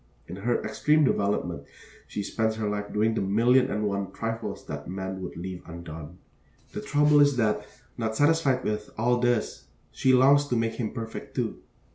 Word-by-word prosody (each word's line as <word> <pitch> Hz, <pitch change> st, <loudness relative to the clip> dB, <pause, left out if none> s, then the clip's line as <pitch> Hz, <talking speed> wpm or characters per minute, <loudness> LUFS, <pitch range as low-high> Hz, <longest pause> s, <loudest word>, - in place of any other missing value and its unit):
In 90 Hz, -, -7 dB
her 120 Hz, +4 st, 0 dB
extreme 155 Hz, +1 st, +2 dB
development 100 Hz, -, 0 dB, 0.4 s
she 105 Hz, -, -4 dB
spends 110 Hz, +2 st, -1 dB
her 110 Hz, -1 st, -2 dB
life 105 Hz, 0 st, -3 dB
doing 110 Hz, +2 st, +2 dB
the -, -, -1 dB
million 120 Hz, +7 st, +3 dB
and 105 Hz, -3 st, -1 dB
one 100 Hz, -2 st, -2 dB
trifles 115 Hz, 0 st, -4 dB
that 75 Hz, 0 st, -6 dB
man 95 Hz, 0 st, -4 dB
would 90 Hz, -, -6 dB
leave 90 Hz, +1 st, -6 dB
undone. 85 Hz, -1 st, -9 dB, 0.5 s
The -, -, -5 dB
trouble 150 Hz, 0 st, +4 dB
is 145 Hz, -2 st, +5 dB
that, 105 Hz, -2 st, +1 dB, 0.3 s
not 110 Hz, -1 st, -1 dB
satisfied 145 Hz, -2 st, +3 dB
with 105 Hz, 0 st, -2 dB
all 120 Hz, +2 st, +2 dB
this, 120 Hz, -2 st, 0 dB, 0.3 s
she 130 Hz, -, +2 dB
longs 140 Hz, +3 st, +5 dB
to 125 Hz, -, 0 dB
make 115 Hz, -1 st, 0 dB
him 115 Hz, -2 st, -3 dB
perfect, 115 Hz, -1 st, -7 dB
too. -, -, -2 dB
110 Hz, 175 wpm, -27 LUFS, 100-125 Hz, 0.5 s, is